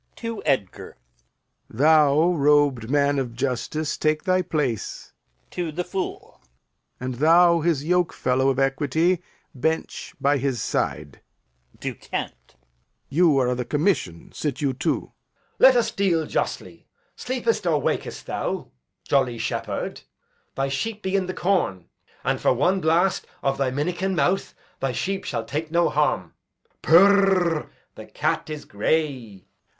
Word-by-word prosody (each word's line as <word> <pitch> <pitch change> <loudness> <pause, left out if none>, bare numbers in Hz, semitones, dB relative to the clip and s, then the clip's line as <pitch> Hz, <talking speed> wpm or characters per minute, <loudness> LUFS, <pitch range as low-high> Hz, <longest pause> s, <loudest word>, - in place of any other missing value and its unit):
[To 230 -2 -5
Edgar] 105 -9 -2 0.7
Thou, 150 +4 +4
robed 145 -6 +2
man 145 0 +2
of 120 -3 -4
justice, 140 +4 -2
take 155 0 0
thy 185 -1 +2
place. 150 - -3 0.4
[To 175 -3 -3
the 175 +4 -3
Fool] 185 +1 -6 0.6
And 130 +1 -4
thou, 170 +5 +5
his 155 -3 0
yokefellow 155 -7 +1
of 135 - 0
equity, 145 +6 +1 0.3
Bench 160 +4 -3
by 140 0 +2
his 130 -2 -1
side. - - -3 0.6
[To - - -3
Kent] - - -7 0.5
You 160 0 +3
are 130 -2 +2
o' 125 - 0
th' 125 -1 -5
commission, 145 - -1
Sit 145 -3 -3
you 140 -3 0
too. 125 - -2
Edg. - - -44
Let 260 -1 +7
us 240 - +2
deal 175 -5 +1
justly. - - -4 0.3
Sleepest 240 -6 -1
or 155 -3 +2
wakest - - -3
thou, - - -4 0.4
jolly 130 -4 +1
shepherd? - - -4 0.5
Thy 135 0 0
sheep 210 +11 -3
be 190 +1 -1
in 190 -2 +1
the 185 - -4
corn; 175 - 0 0.3
And - - -1
for - - +3
one 185 +9 +1
blast 170 +4 +2 0.2
of 135 0 0
thy 135 -2 +1
minikin 175 +8 -2
mouth 185 +2 0 0.2
Thy 135 -2 -1
sheep 195 +8 -3
shall 115 - -3
take 150 +6 -4
no 170 +1 +2
harm. 140 - 0 0.5
Purr! 185 -2 +4 0.2
the - - -11
cat - - -2
is 150 -1 -6
gray. 115 - -2
150 Hz, 140 wpm, -24 LUFS, 135-180 Hz, 0.7 s, Let